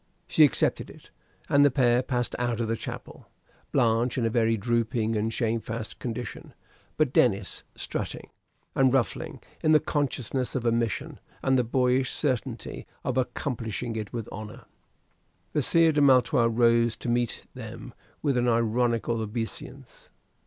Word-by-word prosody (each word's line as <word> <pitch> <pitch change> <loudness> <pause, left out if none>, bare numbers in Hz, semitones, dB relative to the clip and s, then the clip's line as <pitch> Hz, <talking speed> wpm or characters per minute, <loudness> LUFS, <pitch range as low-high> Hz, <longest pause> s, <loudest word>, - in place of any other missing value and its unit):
She 155 - +5
accepted 145 - +2
it; - - -15 0.4
and 140 0 +5
the 145 - +6
pair 125 -2 +3
passed 125 -2 -1
out 120 -2 -1
of 115 - 0
the 115 - 0
chapel, - - -8 0.4
Blanche 120 -1 +2
in 120 - +1
a 115 - +1
very 115 -1 +2
drooping 115 0 0
and 110 +1 0
shamefast 115 -1 -3
condition, 120 -3 -6 0.4
but 155 -4 +2
Denis 100 -5 +2
strutting - - -5 0.4
and 130 -1 +4
ruffling 130 -3 -1 0.2
in 155 - +4
the 155 - +7
consciousness 135 -4 -2
of 125 -2 -2
a 115 - +4
mission, 115 -2 -2 0.2
and 135 - +3
the 125 - +3
boyish 125 +2 +1
certainty 125 -5 -2 0.2
of 125 - -1
accomplishing 120 -3 -2
it 105 -2 -4
with 115 -3 -4
honor. 105 0 -8 0.9
The 150 - +2
Sire 165 +4 +4
de 150 -1 +2
Maletroit 125 -3 +5
rose 115 0 +3
to - - -8
meet 120 0 0
them - - -9 0.3
with 140 -4 +2
an 120 0 +2
ironical 115 0 +1
obeisance. 115 +4 -6
120 Hz, 150 wpm, -27 LUFS, 115-130 Hz, 0.9 s, the